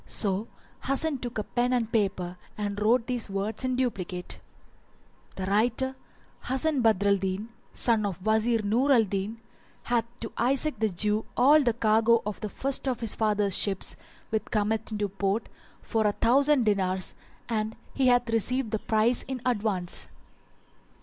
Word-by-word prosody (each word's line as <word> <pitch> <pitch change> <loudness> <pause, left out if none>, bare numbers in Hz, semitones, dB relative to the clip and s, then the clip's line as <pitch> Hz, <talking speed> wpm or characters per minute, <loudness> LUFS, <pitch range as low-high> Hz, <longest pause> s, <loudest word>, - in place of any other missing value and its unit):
So 205 +1 +2 0.4
Hasan 275 +1 0
took 245 -1 -5
a 215 - -1
pen 245 +3 0
and 230 -2 0
paper 190 -5 0 0.2
and 205 -1 -3
wrote 230 +2 +3
these 245 -4 -1
words 200 +5 -3
in 255 0 0
duplicate, 190 -8 -2 1.0
"The 190 - -4
writer, 235 +6 +1 0.5
Hasan 270 +2 +1
Badr 215 -3 +3
al 200 - +4
Din, 190 +3 -3 0.3
son 225 -3 +2
of 190 - -4
Wazir 220 +1 +2
Nur 240 +8 +2
al 240 -4 +6
Din, 200 +2 -3 0.4
hath 235 -2 +1
sold - - -32
to - - -1
Isaac 275 0 +1
the 220 -1 +2
Jew 210 +4 0
all 290 +5 +6
the 240 -4 +2
cargo 225 +1 +3
of 210 -1 -4
the 210 - -4
first 275 +5 0
of 255 -2 -1
his 225 -3 -1
father's 210 -3 +1
ships 195 -2 0 0.4
which 220 -1 -1
cometh 220 +1 -1
into 210 -1 -1
port, 195 +2 -2 0.4
for 220 -2 +1
a 205 - +1
thousand 270 +3 +3
dinars, 190 -3 +1 0.3
and 220 -1 -2 0.2
he 265 -2 +2
hath 245 -1 +4
received 230 +1 +1
the 220 - -1
price 220 +3 +2
in 260 -1 -4
advance." 205 -7 0
220 Hz, 165 wpm, -27 LUFS, 205-245 Hz, 1.0 s, al